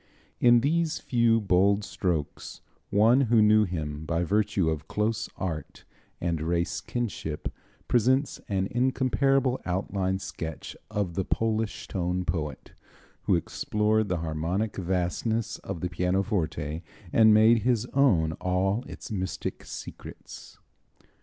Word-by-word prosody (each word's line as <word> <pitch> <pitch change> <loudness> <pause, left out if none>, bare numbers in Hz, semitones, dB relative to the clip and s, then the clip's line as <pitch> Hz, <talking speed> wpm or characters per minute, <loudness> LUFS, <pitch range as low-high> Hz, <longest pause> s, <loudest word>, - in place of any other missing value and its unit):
In 120 -1 +6
these 160 +4 +1
few, 115 -2 +2
bold 100 +1 +3
strokes 90 -6 -3 0.3
one 115 +6 +5
who 115 -1 +5
knew 105 0 +5
him 75 -4 -4
by 85 +1 0
virtue 100 -1 +1
of 80 -2 -2
close 110 +1 -1
art 85 -5 -5 0.3
and 85 -3 -1
race 85 0 -1
kinship, 100 -9 -4 0.3
presents 130 +4 +2
an 95 -2 0
incomparable 130 +1 +1
outline 95 +1 -1
sketch 80 -4 -6
of 105 -5 -2
the 95 - -1
Polish 110 +1 -1
tone 90 0 -2
poet 75 -5 -4 0.5
who - - +4
explored 105 0 0
the 90 - 0
harmonic 85 +7 -2
vastness 95 +5 -1
of 85 - -6
the 90 - -1
pianoforte 90 -4 -1 0.3
and 110 -1 +7
made 110 +2 +6
his 120 0 +1
own 95 - +3
all 95 +5 +1
its - - -9
mystic 95 -3 -4
secrets. - - -10
100 Hz, 120 wpm, -27 LUFS, 85-115 Hz, 0.5 s, and